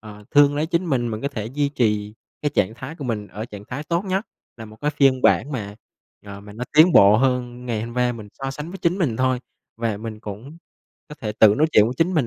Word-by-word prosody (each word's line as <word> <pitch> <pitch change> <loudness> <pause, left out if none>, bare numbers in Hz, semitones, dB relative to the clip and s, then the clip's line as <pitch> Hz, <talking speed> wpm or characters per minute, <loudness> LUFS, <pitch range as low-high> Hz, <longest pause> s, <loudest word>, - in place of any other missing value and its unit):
ờ, 105 -1 -12
thương 145 0 +5
lấy 150 +2 0
chính 170 +2 -1
mình, 125 -6 0
mình 110 -1 -4
có 140 - 0
thể 110 -7 -5
duy 140 +4 -1
trì 105 -6 -1 0.3
cái 145 - 0
trạng 100 +4 +1
thái 130 +5 -8
của 150 - -8
mình 110 -4 -3
ở 105 +2 -7
trạng 105 -3 -10
thái 135 +4 -5
tốt 170 +4 -1
nhất, 195 +2 -1 0.3
là 115 - -9
một 110 0 -13
cái 150 - 0
phiên 135 -3 +3
bản 145 - +3
mà, 105 -6 -5 0.5
ờ, 100 0 -8
mà 105 0 -12
nó 115 +4 -5
tiến 165 +3 +7
bộ 100 -3 +7
hơn 125 0 -1
ngày 115 -3 -2
hôm 115 +1 -7
qua. 125 -1 +1
Mình 110 -3 -9
so 135 0 -5
sánh 150 +4 -7
với 190 - -8
chính 175 +2 0
mình 140 - 0
thôi, 130 0 +1 0.4
và 115 -2 -2
mình 110 0 -7
cũng 110 +9 -9 0.5
có 150 - -9
thể 105 -2 -3
tự 105 -1 +5
nói 155 +6 +3
chuyện 105 - +6
với 120 +3 -2
chính 170 +5 +1
mình 145 -7 +2
125 Hz, 260 wpm, -22 LUFS, 110-145 Hz, 0.5 s, tiến